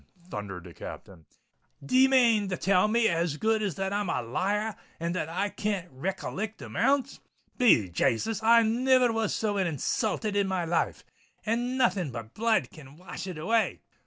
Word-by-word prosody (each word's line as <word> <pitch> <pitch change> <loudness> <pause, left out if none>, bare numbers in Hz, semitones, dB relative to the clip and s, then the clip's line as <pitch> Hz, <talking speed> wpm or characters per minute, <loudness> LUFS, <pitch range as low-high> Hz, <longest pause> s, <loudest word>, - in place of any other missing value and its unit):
thundered 100 -4 -6
the 90 -2 -12
Captain. 85 -2 -10 0.6
"D'ye 260 - +5
mane 235 -6 +4
to 185 - -2
tell 195 +1 +3
me 230 +1 +3
as 165 -4 0
good 220 +4 +1
as 200 -4 -2
that 195 0 -2
I'm 205 -2 -1
a 125 - -1
liar 200 - -1
r, 215 - -9 0.2
and 170 +1 -2
that 170 -4 -2
I 190 +5 -1
can't 200 -4 -3
recollect 190 +8 -4
amounts?—Be 245 - +1
Jasus! 195 - 0
I 230 +1 +6
niver 250 +2 +3
was 225 -1 0
so 210 -2 -1
insulthed 200 - -1
in 200 -1 +2
my 185 -2 -1
life—and 230 +8 -3
nothing 190 - +1
but 115 -3 -8
blood 225 0 +1
can 145 -4 -14
wash 185 +1 -8
it 180 -4 -6
away!" 220 +8 0
200 Hz, 160 wpm, -28 LUFS, 165-225 Hz, 0.6 s, I